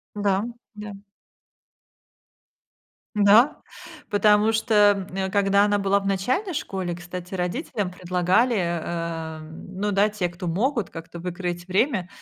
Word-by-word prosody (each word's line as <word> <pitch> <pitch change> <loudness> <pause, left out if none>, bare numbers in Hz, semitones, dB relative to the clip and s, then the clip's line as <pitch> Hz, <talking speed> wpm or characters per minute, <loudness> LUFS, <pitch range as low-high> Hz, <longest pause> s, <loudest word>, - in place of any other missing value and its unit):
Да, 200 -1 +1 0.3
да. 210 0 -7 2.2
Да, 210 +7 +5 0.5
потому 210 +1 +4
что, 205 -3 +3
м, 190 +1 -2
когда 200 0 +3
она 205 0 +1
была 200 0 +2
в 195 - -8
начальной 255 - 0
школе, 185 - -3
кстати, 175 +1 -8
родителям 190 - -2
предлагали, 180 +7 +1
э, 165 -2 -3
м, 160 +4 -11
ну 210 - +1
да, 200 +1 +4
те, 205 -4 -2
кто 175 +1 -7
могут, 220 - 0
как-то 165 +1 -9
выкроить 175 0 -4
время, 190 -1 +1
195 Hz, 125 wpm, -24 LUFS, 175-210 Hz, 2.2 s, Да